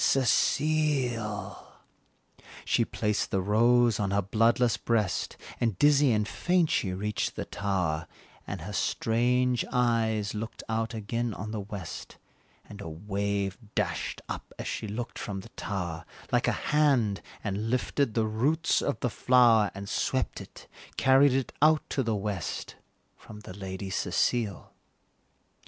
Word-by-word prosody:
Cecile!" 130 -5 +1 1.0
She 115 - +3
placed 105 -2 -1
the 95 - 0
rose 115 +3 +3
on 100 -2 0
her 100 +1 +1
bloodless 115 +4 +3
breast, 110 -6 -1 0.2
And 115 -6 0
dizzy 145 0 +5
and 105 -1 +1
faint 175 +5 +1
she 95 - +1
reached 105 +3 -2
the - - -4
tower, 90 -5 -1 0.4
And 95 -4 -5
her 100 +6 -6
strange 125 +4 +1
eyes 115 -4 +1
looked 110 +1 -6
out 115 +1 -1
again 115 +1 -2
on 105 +2 -5
the 110 - -3
west, 100 -3 -7 0.5
And 100 0 -10
a 85 - -6
wave 100 +3 -2 0.2
dashed 90 -8 -2
up, - - -6
as - - -5
she - - -3
looked 115 +4 -5
from 100 -3 -4
the - - -13
tower, 85 -5 -4 0.3
Like - - +2
a - - +4 0.2
hand, 130 -10 +3 0.2
and 105 +2 -2
lifted 130 0 0
the 110 -2 +2
roots 135 +10 +1
of 145 - -1
the 125 - +1
flower, 115 -3 +5
And 100 0 -6
swept - - -1
it - - -13 0.3
carried 135 +1 +5
it 130 -3 -1
out 155 0 +4
to 135 - +1
the 115 -3 0
west, 100 -4 -3 0.4
From 105 0 -12
the 100 - -9
Lady 95 0 -6
Cecile. 100 +2 0
110 Hz, 145 wpm, -28 LUFS, 100-125 Hz, 1.0 s, dizzy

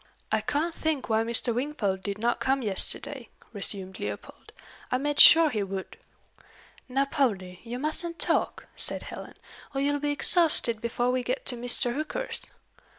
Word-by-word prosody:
"I 220 0 +1
can't 300 +9 -2
think 315 -6 -3
why 220 0 +2
Mr. 235 +1 +1
Wingfold 235 -7 -2
did 200 +1 -5
not 235 +3 -1
come 265 0 0
yesterday," 230 +5 -1 0.2
resumed 195 -2 -2
Leopold. - - -8 0.4
"I 255 - +2
made 290 +2 -2
sure 325 -2 +9
he 215 -4 -2
would." 195 -1 -6 0.9
"Now, 270 +2 +1
Poldie, 200 - -2
you 240 +1 -7
mustn't 325 +4 -3
talk," - - -1
said - - 0
Helen, - - -10 0.4
"or - - -1
you'll 290 +1 0
be 295 +1 -2
exhausted 290 -7 +4
before 240 +1 -1
we 255 0 -1
get 250 +2 -4
to 250 - 0
Mr. 240 0 +1
Hooker's." 310 - -4
250 Hz, 155 wpm, -26 LUFS, 220-290 Hz, 0.9 s, sure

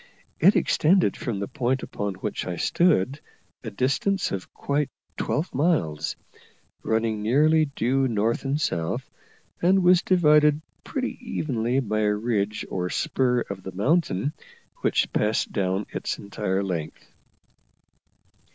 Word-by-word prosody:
It 195 - +6
extended 180 +4 +3
from 120 -6 -3
the 100 - -3
point 130 +1 -1
upon 100 -2 -4
which 100 +1 -4
I 90 - -2
stood 140 - +2 0.4
a 115 - -4
distance 135 - 0
of 95 -2 -5
quite 145 0 -1 0.3
twelve 160 +4 -2
miles, 140 - 0 0.7
running 110 -1 0
nearly 155 +8 +4
due 135 -1 0
north 115 0 0
and 140 +2 -1
south, 85 - -2 0.5
and 185 +2 +4
was 180 0 +6
divided 150 -4 +4 0.2
pretty 265 -3 -4
evenly 130 - -1
by 110 -3 -1
a 105 -1 +2
ridge 105 -1 -1
or 90 -1 -2
spur 125 +3 +1
of 100 -1 -6
the 95 0 -8
mountain, 135 - +1 0.4
which - - 0
passed 105 +1 +1
down 95 0 -1
its - - -3
entire 100 -1 -2
length. 85 -5 -4
120 Hz, 130 wpm, -25 LUFS, 100-150 Hz, 0.7 s, It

